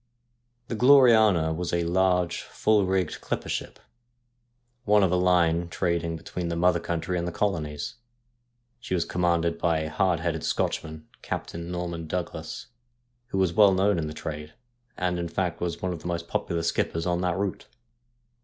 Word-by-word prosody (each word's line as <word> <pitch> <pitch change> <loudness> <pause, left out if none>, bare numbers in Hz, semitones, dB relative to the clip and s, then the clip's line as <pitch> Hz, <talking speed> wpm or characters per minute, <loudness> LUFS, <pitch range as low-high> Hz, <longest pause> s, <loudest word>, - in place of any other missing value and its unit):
The - - -4
Gloriana 110 - +5
was 85 +1 -3
a 85 0 +1
large, 90 0 +1
full 105 -3 +1
rigged, 95 -1 -1
clipper - - -3
ship, - - -4 1.1
one 105 -2 +4
of 95 - +2
a - - +3
line 85 -2 +2
trading 85 -2 -1
between 85 +2 -5
the 85 - -2
mother 85 +1 +3
country 85 +2 -2
and 85 - -3
the - - -2
colonies. 75 -5 -2 0.8
She 105 -6 -3
was 85 - 0
commanded 85 -1 0
by 80 -2 +1
a 80 0 -4
hard 90 -1 +1
headed 80 -2 -2
Scotchman, 80 0 -2
Captain 85 +1 -5
Norman 85 -2 -4
Douglas, 85 -2 -5 0.6
who 110 - -4
was 95 -3 +2
well 100 0 +6
known 95 -1 +2
in 80 - -2
the 75 - -6
trade, 75 -1 -6 0.4
and, 90 -1 -1
in 85 - -2
fact, 85 0 -2
was 85 0 -3
one 90 -1 0
of 85 - -7
the - - -6
most 85 -1 -3
popular 85 -1 -2
skippers 85 0 -1
on 90 0 0
that 90 -1 0
route. 100 -1 -3
85 Hz, 170 wpm, -26 LUFS, 85-95 Hz, 1.1 s, well